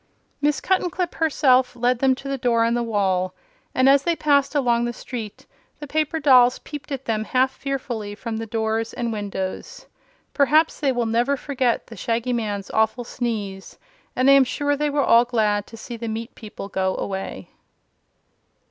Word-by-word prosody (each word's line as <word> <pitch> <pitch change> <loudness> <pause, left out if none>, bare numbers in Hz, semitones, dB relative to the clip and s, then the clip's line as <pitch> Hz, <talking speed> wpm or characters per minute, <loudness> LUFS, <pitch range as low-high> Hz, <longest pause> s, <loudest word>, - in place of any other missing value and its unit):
Miss 295 0 +2
Cuttenclip 365 -1 -1
herself 265 -5 +2
led 245 0 +1
them 265 0 +3
to 275 - -9
the 275 - -1
door 235 -2 +2
in 230 - +1
the 240 - 0
wall, 190 -5 0 0.4
and 255 +1 +4
as 275 0 +6
they 340 +3 0
passed 285 -2 +2
along 240 -4 +2
the 240 - -3
street 230 -4 -7 0.3
the 295 - -6
paper 310 +2 -1
dolls 255 -4 +5
peeped 295 -1 -9
at 270 -1 -4
them 215 -1 -1
half 255 +3 +1
fearfully 245 -7 -4
from 225 0 -5
the 225 0 -5
doors 225 +1 -1
and 235 -2 -3
windows. 195 -3 -5 0.5
Perhaps 305 +3 +3
they 280 -3 +2
will 245 -2 -1
never 240 +5 +1
forget 255 -4 -1
the - - -11
Shaggy 235 +1 -1
Man's 205 -4 -3
awful 220 +3 +1
sneeze, 210 -6 -5 0.4
and 255 +1 +2
I 275 - +8
am 275 -1 +7
sure 290 +3 -1
they 295 +1 0
were 285 -1 +1
all 230 +1 +6
glad 215 -4 0
to 225 - -12
see 235 +1 -8
the 230 0 -5
meat 225 +1 -5
people 210 -3 -9
go 190 -1 -1
away. 195 -1 -5
245 Hz, 180 wpm, -23 LUFS, 220-275 Hz, 0.5 s, I